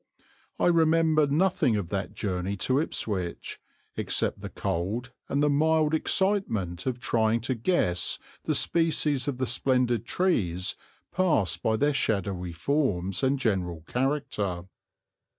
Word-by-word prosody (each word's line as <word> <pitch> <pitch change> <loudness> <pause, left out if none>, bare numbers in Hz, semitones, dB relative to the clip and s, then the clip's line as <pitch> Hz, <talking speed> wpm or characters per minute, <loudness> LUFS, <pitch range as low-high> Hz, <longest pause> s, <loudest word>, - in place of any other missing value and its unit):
I - - +1
remember 160 -2 +4
nothing 155 - +2
of 100 -5 -2
that 100 0 -3
journey 95 -1 -2
to 130 +7 +1
Ipswich, 95 - -3 0.4
except - - -1
the - - -6
cold 110 +9 -3 0.2
and 140 +1 +1
the - - +4
mild 155 +1 +2
excitement 130 - 0
of 125 -1 -1
trying 115 -1 +1
to 130 +3 -1
guess 110 - +1 0.3
the - - +1
species 150 -5 +1
of 140 -3 -2
the 130 - 0
splendid 125 -1 +1
trees 95 - 0 0.4
passed 155 - +1
by 110 - +1
their 145 +3 +2
shadowy 95 -8 -1
forms 95 - 0
and 135 +1 +2
general 95 -9 -1
character. 120 - -2
125 Hz, 130 wpm, -27 LUFS, 95-150 Hz, 0.4 s, remember